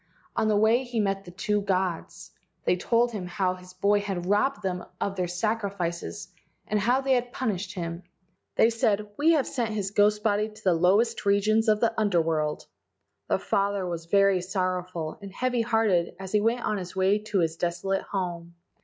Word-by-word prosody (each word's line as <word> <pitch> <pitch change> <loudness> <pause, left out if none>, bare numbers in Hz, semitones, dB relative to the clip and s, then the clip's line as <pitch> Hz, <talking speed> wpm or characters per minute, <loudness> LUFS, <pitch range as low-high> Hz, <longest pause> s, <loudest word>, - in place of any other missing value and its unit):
On 220 - +1
the 210 -1 +3
way 220 +4 +4
he 240 -2 -3
met 195 -1 0
the - - -9
two 205 +3 -1
gods. 185 -3 -2 0.3
They 180 - +3
told 235 +6 +1
him 195 -5 -5
how 185 0 0
his 180 0 -13
boy 200 +2 +3
had 195 -4 -3
robbed 210 +4 +1
them 180 -1 -2 0.2
of 195 - -2
their 180 -2 -1
sacrifices 180 - -3 0.4
and 210 - 0
how 245 +6 +2
they 270 0 +2
had 245 -1 0
punished 205 -8 -3
him. 170 -1 -4 0.5
They 225 - +5
said, 215 -3 +1
"We 320 +6 +4
have 290 -5 +2
sent 230 -4 -2
his 195 -2 -2
ghost 210 0 +3
body 210 0 +1
to 215 0 -16
the 185 - +4
lowest 200 +8 +2
regions 210 +3 +2
of 215 -1 +3
the 230 -1 +2
Under 205 -5 +2
world.,, 155 -2 -1 0.6
The - - +2
father 200 -1 0
was 170 -2 -4
very 195 0 +4
sorrowful 180 -3 -3
and 200 -1 -8
heavy 250 +3 0
hearted 220 -7 +1
as 190 -1 -7
he 210 - +3
went 230 +3 +1
on 210 -1 0
his 180 -1 -8
way 190 +2 +3
to 210 -1 -3
his 165 -1 0
desolate 190 +3 -1
home. 170 -3 -4
200 Hz, 190 wpm, -27 LUFS, 180-215 Hz, 0.6 s, They